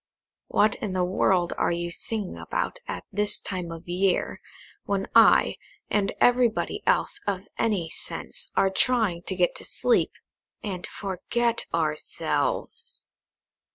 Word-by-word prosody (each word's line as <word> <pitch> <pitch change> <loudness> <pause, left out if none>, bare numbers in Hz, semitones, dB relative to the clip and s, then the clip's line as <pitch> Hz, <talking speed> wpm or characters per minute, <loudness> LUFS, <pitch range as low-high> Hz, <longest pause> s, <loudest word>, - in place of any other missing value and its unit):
"What 210 0 +3
in 205 -3 -4
the 185 -1 +1
world 180 -1 +2
are - - +2
you 170 0 -2
singing 210 +1 -2
about - - -3
at - - -5
this 210 +1 +1
time 180 -3 -4
of 165 +1 -9
year, 185 +1 0 0.4
when 195 -1 -1
I, 230 0 +6 0.3
and 200 -1 +2
everybody 245 -2 +2
else - - +2
of 195 -2 0 0.2
any 205 -7 +1
sense, - - 0
are 195 - +3
trying 205 -4 +1
to 190 - -2
go 180 -1 +4
to - - -6
sleep, - - +2 0.5
and 190 -4 -4
forget 230 +5 -1
ourselves?" 165 - -1
195 Hz, 130 wpm, -26 LUFS, 180-220 Hz, 0.5 s, I